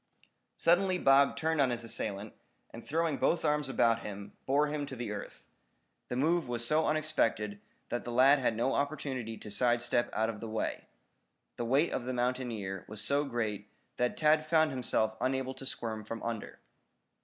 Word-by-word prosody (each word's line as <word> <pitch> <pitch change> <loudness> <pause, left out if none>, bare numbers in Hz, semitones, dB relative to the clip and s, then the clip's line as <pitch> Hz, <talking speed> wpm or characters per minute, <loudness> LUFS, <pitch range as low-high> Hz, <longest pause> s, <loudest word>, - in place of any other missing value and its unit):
Suddenly 185 +2 +3
Bob 140 -3 +4
turned 160 -1 +1
on 135 - +4
his 120 -1 -2
assailant, 105 -2 -4 0.4
and 115 - -9
throwing 160 -1 0
both 170 - +1
arms 150 -2 +1
about 115 -3 +3
him, 100 -2 -7
bore 145 +3 +3
him 150 -1 -3
to 120 -5 -5
earth. 105 - -8 0.6
The - - -3
move 160 +4 +2
was 120 -1 -1
so 155 +5 +2
unexpected 115 -9 0 0.3
that 120 - -2
the 120 - -5
lad 135 +4 +6
had 125 -3 +1
no 120 +4 +1
opportunity 135 -6 -2
to 105 - -9
side 120 +3 +2
step 120 0 0
out 110 +1 0
of 105 - -10
the 115 - -6
way. 110 - -3 0.7
The 120 - -2
weight 135 +7 +2
of 120 - -2
the 130 - -2
mountaineer 120 -7 -2
was 105 0 -6
so 140 +6 +2
great 110 -5 -3 0.3
that 125 0 0
Tad 155 0 +3
found 160 -1 +4
himself 110 -4 0
unable 130 0 0
to 135 0 -7
squirm 110 -3 -3
from 115 +2 -6
under. 115 -2 -4
125 Hz, 180 wpm, -31 LUFS, 115-145 Hz, 0.7 s, lad